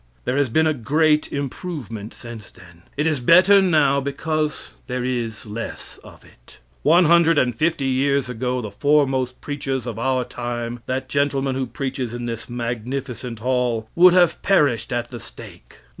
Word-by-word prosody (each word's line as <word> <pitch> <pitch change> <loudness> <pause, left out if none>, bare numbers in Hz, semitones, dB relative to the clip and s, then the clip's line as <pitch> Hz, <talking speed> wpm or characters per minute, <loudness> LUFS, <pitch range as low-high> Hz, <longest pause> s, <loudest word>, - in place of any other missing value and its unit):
There 125 +2 0
has 140 -3 +2
been 160 +7 +2
a 155 - +2
great 150 +4 +1
improvement 135 - -5
since 115 -3 -10
then. 85 -2 -17 0.2
It 150 - 0
is 155 -3 +1
better 185 +9 +6
now 150 -7 +3
because 150 +2 -3
there 125 -1 -3
is 120 -4 -3
less 110 +2 -7
of - - -15
it. - - -19 0.2
One 170 +4 +5
hundred 165 0 +5
and 125 -4 +2
fifty 160 +1 0
years 135 +1 +1
ago 125 +1 -2
the 105 -3 -6
foremost 135 0 +1
preachers 135 -4 -3
of 115 -3 -5
our 130 +1 +1
time 120 -1 -5
that 130 0 -2
gentleman 140 -1 0
who 130 0 -2
preaches 130 -3 -4
in 120 0 -5
this 115 0 -5
magnificent 120 0 -5
hall 125 -3 0
would 180 +1 +6
have 175 -2 +3
perished 135 - +2
at 120 0 -2
the 120 - -7
stake. - - -12
130 Hz, 165 wpm, -22 LUFS, 120-150 Hz, 0.2 s, better